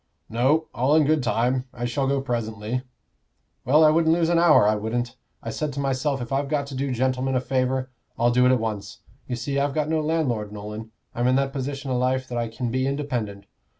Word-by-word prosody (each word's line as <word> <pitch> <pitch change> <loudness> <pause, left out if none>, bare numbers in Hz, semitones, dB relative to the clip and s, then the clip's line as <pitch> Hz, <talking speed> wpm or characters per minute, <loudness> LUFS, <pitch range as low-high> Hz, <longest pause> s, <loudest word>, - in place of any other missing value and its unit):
"No; 135 +8 +2
all 130 +5 +2
in 155 -2 +5
good 155 +1 +2
time. 125 +2 0
I 120 - -5
shall 135 +3 -1
go 140 0 +1
presently." 115 -2 -3 0.8
"Well, 150 +5 +5
I 155 - +7
wouldn't 160 0 +3
lose 170 -1 +1
an 170 -1 +3
hour, 160 -11 +6
I 105 - +4
wouldn't. 115 +3 -2 0.3
I 115 - -4
said 150 +6 -2
to 140 - -5
myself, 135 -1 -1
if 120 - -9
I've 135 +1 0
got 145 -2 0
to 140 - -7
do 135 +1 -1
gentlemen 130 +1 0
a - - +3
favor, 130 0 -1 0.3
I'll 120 +1 +3
do 125 +1 +4
it - - +5
at 130 - +3
once. 105 -3 -5 0.3
You 125 - -2
see, 140 +4 -2
I've 140 0 0
got 155 -1 0
no 160 -1 +1
landlord, 140 -10 -1
Nolan 105 +1 -7 0.2
I'm 120 +1 0
in 130 - +3
that 135 0 0
position 140 0 -4
o' 125 - +1
life 130 +1 0
that 120 - -3
I 120 - -1
can 115 +1 -4
be 130 +2 0
independent." 120 -8 -3
130 Hz, 225 wpm, -24 LUFS, 120-140 Hz, 0.8 s, I